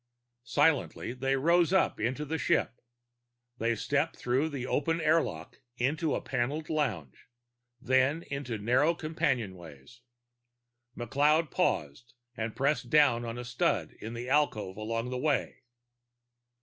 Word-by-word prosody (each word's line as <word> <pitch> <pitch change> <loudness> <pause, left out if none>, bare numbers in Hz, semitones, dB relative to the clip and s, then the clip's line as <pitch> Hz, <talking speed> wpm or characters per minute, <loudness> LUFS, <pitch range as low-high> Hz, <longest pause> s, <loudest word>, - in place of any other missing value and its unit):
Silently 145 -4 +1
they 135 +2 0
rode 170 +5 +3
up 190 - +2
into 130 +7 -1
the 160 +2 -3
ship. 120 - 0 0.8
They 115 +1 +1
stepped - - 0
through 130 +6 0
the 135 -4 -5
open 165 +5 0
airlock 155 - 0 0.2
into 150 +6 0
a - - -2
paneled 145 +7 -2
lounge, 110 - -3 0.5
then 130 +7 +2
into 140 -5 -4
narrow 130 +10 +2
companionways. 115 - -3 1.0
McLeod 145 +6 +2
paused 95 - -1 0.2
and 110 -1 -4
pressed 135 -3 0
down 145 -5 +4
a 120 - -6
stud 120 0 0
in 115 +2 -6
an 120 +1 -5
alcove 130 -9 +1
along 115 +3 -3
the 125 - -2
way. 145 -2 -1
130 Hz, 125 wpm, -30 LUFS, 115-150 Hz, 1.0 s, down